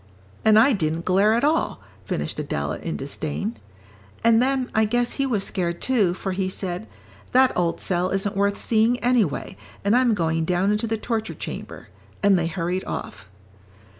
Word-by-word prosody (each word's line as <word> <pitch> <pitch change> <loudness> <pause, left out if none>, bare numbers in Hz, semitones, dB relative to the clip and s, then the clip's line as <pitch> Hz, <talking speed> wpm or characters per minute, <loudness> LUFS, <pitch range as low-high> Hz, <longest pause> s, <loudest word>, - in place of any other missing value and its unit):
And 215 -1 +6
I 255 +5 +6
didn't 165 -4 -1
glare 195 +4 +4
at 235 - 0
all," 310 +3 +1 0.3
finished 75 -4 -3
Adela, 70 0 -3
in - - -4
disdain. 80 +11 -4 0.7
"And 230 0 +5
then 260 0 0
I 220 - +3
guess 240 +3 +1
he 275 - -1
was 215 -6 0
scared, 170 -3 -2
too, 210 -9 +2
for 190 0 -4
he 185 0 -1
said, 190 +2 -4 0.5
'That 260 0 +5
old 170 -2 0
cell 180 0 0
isn't 195 +2 -1
worth 200 0 +1
seeing, 230 +2 +2
anyway, 225 - +1 0.3
and 205 +3 +4
I'm 245 -3 +4
going 165 -3 0
down 180 +4 +1
into 210 +2 0
the 225 0 -1
torture 220 0 -3
chamber,' - - -7 0.3
and 200 -1 +5
they 170 -2 +1
hurried 175 +2 -2
off." 95 - -6
200 Hz, 170 wpm, -23 LUFS, 175-230 Hz, 0.7 s, And